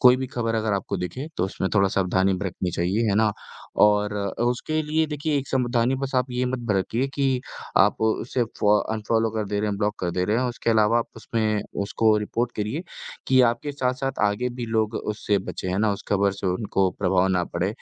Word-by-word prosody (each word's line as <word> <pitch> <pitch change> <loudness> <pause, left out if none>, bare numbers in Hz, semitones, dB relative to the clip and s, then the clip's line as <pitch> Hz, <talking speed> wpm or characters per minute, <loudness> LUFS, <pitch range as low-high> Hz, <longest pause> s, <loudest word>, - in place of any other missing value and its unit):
कोई 125 -1 +7
भी 130 - -3
खबर 115 -2 -2
अगर 110 -1 0
आपको 100 - -2
दिखे, 90 - -4
तो 90 - +1
उसमें 95 0 -2
थोड़ा 100 -1 +4
सावधानी 95 0 +1
बरतनी 90 -1 -3
चाहिए, 90 +6 0
है 100 - +2
ना? 110 -1 +4 0.5
और 105 0 +4
अ, 100 +2 -2
उसके 125 +6 0
लिए 155 +1 +1
देखिए 150 0 -1
एक 135 -1 -5
सावधानी 125 -1 +1
बस 135 0 -3
आप 125 0 +2
ये 125 +1 -1
मत 125 0 -2
बरतिए 110 +7 0
कि 135 -3 +1 0.4
आप 100 +2 +4
उसे 115 +3 0 0.2
फॉ 105 0 +5 0.2
अनफ़ॉलो 110 +1 0
कर 110 - 0
दे 105 0 -1
रहे 105 - 0
हैं, 100 - -2
ब्लॉक 105 0 0
कर 90 - -1
दे 90 +1 0
रहे 105 +3 +1
हैं, 125 - +1
उसके 120 -1 -2
अलावा 110 +1 +4
आप 115 - -2
उसमें 110 -2 -1 0.2
उसको 110 +2 +2
रिपोर्ट 115 +3 -2
करिए 110 +10 -2 0.5
कि 130 -1 +6
आपके 145 +4 -6
साथ-साथ 135 0 -2
आगे 105 +5 0
भी 120 - -2
लोग 110 -1 0
उससे 105 -1 -1
बचे, 95 - -4
हैं 90 +1 -1
ना? 105 0 +2
उस 100 - -6
खबर 100 -1 +2
से 100 0 -5
उनको 95 0 +1
प्रभाव 95 -1 +2
ना 90 -2 +1
पड़े, 85 +2 +1
110 Hz, 215 wpm, -24 LUFS, 100-125 Hz, 0.5 s, कोई